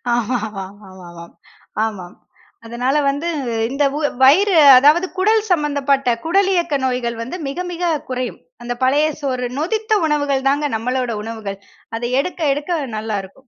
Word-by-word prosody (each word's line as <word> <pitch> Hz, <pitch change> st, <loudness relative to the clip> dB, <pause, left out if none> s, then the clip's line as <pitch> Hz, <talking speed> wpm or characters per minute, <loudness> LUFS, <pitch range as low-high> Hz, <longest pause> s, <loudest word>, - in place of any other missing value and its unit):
ஆமாமாமாமா, 200 Hz, -5 st, -5 dB, 0.8 s
ஆமாம். 190 Hz, -5 st, -7 dB, 0.5 s
அதனால 245 Hz, +5 st, -1 dB
வந்து 285 Hz, +4 st, -1 dB, 0.4 s
இந்த 280 Hz, +2 st, 0 dB
உ -, -, -2 dB, 0.2 s
வயிறு 375 Hz, +10 st, +5 dB, 0.2 s
அதாவது 300 Hz, +8 st, +4 dB
குடல் 430 Hz, +4 st, +3 dB
சம்பந்தப்பட்ட, 285 Hz, -4 st, +1 dB, 0.2 s
குடலியக்க 350 Hz, -3 st, +1 dB
நோய்கள் 245 Hz, -2 st, -2 dB
வந்து 255 Hz, +10 st, -5 dB
மிக, 280 Hz, -, -6 dB
மிக 350 Hz, 0 st, -5 dB, 0.3 s
குறையும். 255 Hz, -1 st, -4 dB, 0.2 s
அந்த 240 Hz, 0 st, -3 dB
பழைய 285 Hz, +4 st, +3 dB
சோறு, 255 Hz, -3 st, -2 dB
நொதித்த 435 Hz, +8 st, -1 dB
உணவுகள் 285 Hz, -3 st, 0 dB
தான் 285 Hz, +2 st, 0 dB
நம்மளோட 250 Hz, +2 st, -2 dB
உணவுகள். 215 Hz, -3 st, -6 dB, 0.4 s
அத -, -, -8 dB, 0.2 s
எடுக்க, 360 Hz, +4 st, -7 dB
எடுக்க 305 Hz, +4 st, -2 dB, 0.2 s
நல்லா 215 Hz, -1 st, -3 dB
இருக்கும். 255 Hz, +8 st, -16 dB
270 Hz, 130 wpm, -19 LUFS, 230-310 Hz, 0.8 s, வயிறு